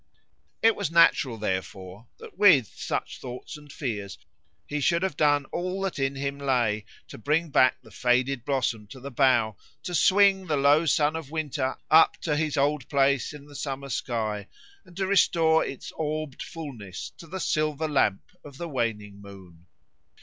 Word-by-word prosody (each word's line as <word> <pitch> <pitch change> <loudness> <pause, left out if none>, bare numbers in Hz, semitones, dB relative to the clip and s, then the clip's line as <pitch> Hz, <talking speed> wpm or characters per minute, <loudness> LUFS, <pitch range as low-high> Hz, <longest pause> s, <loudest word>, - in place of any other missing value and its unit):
It 225 0 +5
was - - -2
natural, 155 -7 +4
therefore, 95 +1 -5
that - - -12
with 175 - +5
such - - -4
thoughts 125 +3 -8
and 150 -1 -13
fears 105 - -5 0.5
he 150 0 -3
should 170 +5 +2
have 190 - -1
done 145 -2 +2
all 180 +2 -3
that 190 -6 -3
in 135 0 0
him 140 +1 -4
lay 120 -6 0 0.2
to - - -11
bring 150 +6 0
back 130 - +4
the - - -16
faded 125 0 +1
blossom 120 -6 -1
to 130 - -11
the 140 +2 -8
bough, 120 -5 +2 0.3
to 180 - -5
swing 190 +2 +4
the 150 -2 0
low 145 +4 +4
sun 150 +1 +2
of 160 -4 -6
winter 150 -4 -2
up 160 +1 +6
to 150 -3 0
his 155 -1 -1
old 140 -1 0
place 140 -1 +2
in 145 -1 -11
the 145 - -15
summer 140 -1 -5
sky, 110 -5 -3 0.4
and 175 - -16
to 195 - 0
restore 165 -4 +3
its 135 - -7
orbed 155 -2 -4
fulness 120 - -8
to 165 - -11
the 190 +4 -6
silver 155 -2 0
lamp 130 -10 +1 0.2
of 140 -2 -12
the 170 - -5
waning 105 -7 -3
moon. 95 -4 -14
140 Hz, 170 wpm, -26 LUFS, 120-155 Hz, 0.5 s, up